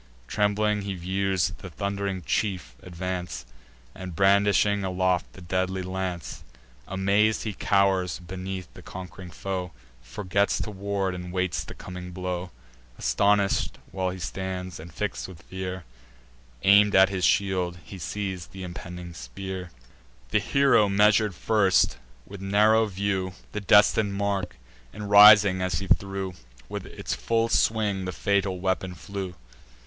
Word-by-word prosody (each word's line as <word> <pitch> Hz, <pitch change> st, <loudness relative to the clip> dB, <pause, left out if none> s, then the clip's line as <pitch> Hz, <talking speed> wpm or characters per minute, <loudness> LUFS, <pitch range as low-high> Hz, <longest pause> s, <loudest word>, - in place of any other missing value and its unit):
Trembling 105 Hz, 0 st, +1 dB
he 100 Hz, -1 st, -4 dB
views 95 Hz, 0 st, 0 dB
the 95 Hz, -, -8 dB
thund'ring 100 Hz, 0 st, -3 dB
chief 90 Hz, -, -1 dB
advance, 90 Hz, 0 st, -5 dB, 0.5 s
And 90 Hz, -2 st, -8 dB
brandishing 100 Hz, +1 st, +3 dB
aloft 95 Hz, -1 st, 0 dB
the 95 Hz, -, -12 dB
deadly 95 Hz, +1 st, -1 dB
lance: 90 Hz, -7 st, -4 dB, 0.4 s
Amaz'd 100 Hz, +3 st, +2 dB
he 105 Hz, -, -3 dB
cow'rs 95 Hz, -1 st, +2 dB
beneath 95 Hz, 0 st, -6 dB
his -, -, -12 dB
conqu'ring 90 Hz, 0 st, -9 dB
foe, 90 Hz, +1 st, -4 dB, 0.3 s
Forgets 100 Hz, +10 st, 0 dB
to 105 Hz, -, -4 dB
ward, 100 Hz, -1 st, -2 dB
and 90 Hz, 0 st, -6 dB
waits 90 Hz, -1 st, -1 dB
the -, -, -10 dB
coming 90 Hz, 0 st, -8 dB
blow. 90 Hz, 0 st, -4 dB, 0.5 s
Astonish'd 100 Hz, -1 st, +2 dB
while 95 Hz, -1 st, -1 dB
he 90 Hz, -, -5 dB
stands, 95 Hz, -1 st, -5 dB
and 85 Hz, +2 st, -10 dB
fix'd 105 Hz, -1 st, -3 dB
with 85 Hz, -3 st, -12 dB
fear, 95 Hz, -1 st, -5 dB, 0.8 s
Aim'd 100 Hz, +1 st, +6 dB
at 95 Hz, 0 st, +7 dB
his 95 Hz, -2 st, -3 dB
shield 90 Hz, -2 st, +1 dB
he 95 Hz, -, -9 dB
sees 95 Hz, 0 st, -4 dB
th' -, -, -19 dB
impending 90 Hz, -1 st, -7 dB
spear. 90 Hz, +8 st, -7 dB, 0.6 s
The -, -, +4 dB
hero 140 Hz, -7 st, +3 dB
measur'd 105 Hz, 0 st, +4 dB
first, 100 Hz, -1 st, +2 dB, 0.3 s
with 100 Hz, -1 st, -10 dB
narrow 105 Hz, +3 st, +4 dB
view, 95 Hz, -1 st, -2 dB, 0.2 s
The 105 Hz, -, -4 dB
destin'd 105 Hz, 0 st, +4 dB
mark; 100 Hz, -1 st, -1 dB, 0.4 s
and, 105 Hz, -1 st, -7 dB
rising 105 Hz, -2 st, +8 dB
as 90 Hz, -2 st, 0 dB
he 95 Hz, -, -3 dB
threw, 95 Hz, 0 st, 0 dB, 0.3 s
With -, -, -6 dB
its -, -, -5 dB
full 115 Hz, 0 st, 0 dB
swing 105 Hz, -4 st, +1 dB
the 90 Hz, -, -3 dB
fatal 100 Hz, -2 st, 0 dB
weapon 95 Hz, 0 st, -1 dB
flew. 95 Hz, +2 st, -6 dB
95 Hz, 135 wpm, -26 LUFS, 90-100 Hz, 0.8 s, rising